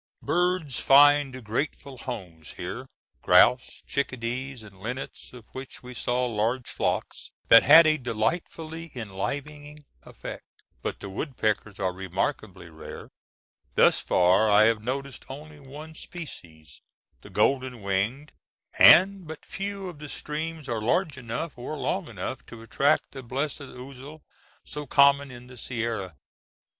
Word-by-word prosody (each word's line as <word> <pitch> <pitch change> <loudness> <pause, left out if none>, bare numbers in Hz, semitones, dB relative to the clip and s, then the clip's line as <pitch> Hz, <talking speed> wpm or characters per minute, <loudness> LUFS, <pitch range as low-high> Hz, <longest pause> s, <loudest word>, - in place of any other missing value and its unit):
Birds 175 -7 +1
find 140 -2 +5
grateful 130 +3 -3
homes 90 - -7
here—grouse, 125 - +1
chickadees, 125 -1 -3
and 100 -2 -14
linnets, 125 +6 -6
of 125 -3 -13
which 130 0 -8
we 125 0 -9
saw 125 +1 0
large 115 +2 -1
flocks - - -2 0.2
that - - +10
had 165 0 +8
a 155 0 +4
delightfully 155 +7 -3
enlivening 145 +8 -5 0.2
effect. - - -9 0.3
But - - -4
the 100 - -6
woodpeckers 110 -4 -2
are 95 -2 0
remarkably 95 - -3
rare. 80 - -10 0.7
Thus - - +5
far 90 +5 +3
I 105 +1 +6
have 110 -1 +3
noticed 135 +3 -4
only 150 +2 -10
one 145 +4 -10
species, 85 - -10 0.4
the - - -13
golden 130 -4 0
winged; 105 +10 -1 0.5
and 190 -1 +7
but 160 0 -9
few 195 0 -5
of 170 -5 -9
the 150 -1 -8
streams 155 +1 -5
are 115 -3 -2
large 150 - +1
enough 125 +4 -5
or 150 +5 -5
long - - -2
enough - - -5
to 115 -1 -10
attract 140 +6 +1
the 135 - -8
blessed 135 +5 -3
ousel, 135 +3 -10 0.4
so 150 -1 -6
common 140 +1 +5
in 120 -1 -11
the 125 0 -13
Sierra. 115 - -4
130 Hz, 130 wpm, -26 LUFS, 110-150 Hz, 0.7 s, that